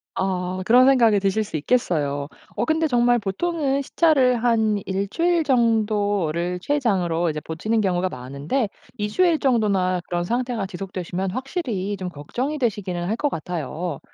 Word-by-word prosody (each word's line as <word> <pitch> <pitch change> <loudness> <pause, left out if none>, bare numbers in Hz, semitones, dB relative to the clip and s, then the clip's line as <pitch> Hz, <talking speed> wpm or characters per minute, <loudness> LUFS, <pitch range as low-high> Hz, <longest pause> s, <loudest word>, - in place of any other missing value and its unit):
아 185 -1 -2
그런 250 +3 +6
생각이 230 -7 +5
드실 195 +2 +1
수 205 -6 -5
있겠어요. 145 - 0 0.3
어 220 - +1
근데 320 0 +2
정말 245 -3 +3
보통은 280 - -1
시차를 260 -6 +3
한 220 -2 +3
1 195 +1 -2
주일 340 - +1
정도를 205 - +1
최장으로 185 - 0
이제 155 0 -4
버티는 215 +9 -1
경우가 185 -1 +1
많은데 140 - -2 0.3
2 210 - -1
주일 340 +6 +3
정도나 200 -8 +1
그런 175 0 -1
상태가 240 -1 -1
지속되시면 185 0 -4
확실히 240 - -3
좀 185 -2 -5
걱정이 245 - -4
되시기는 195 -8 -2
할 220 - 0
것 290 +4 0
같아요. 160 - -4
205 Hz, 325 characters per minute, -23 LUFS, 180-250 Hz, 0.3 s, 그런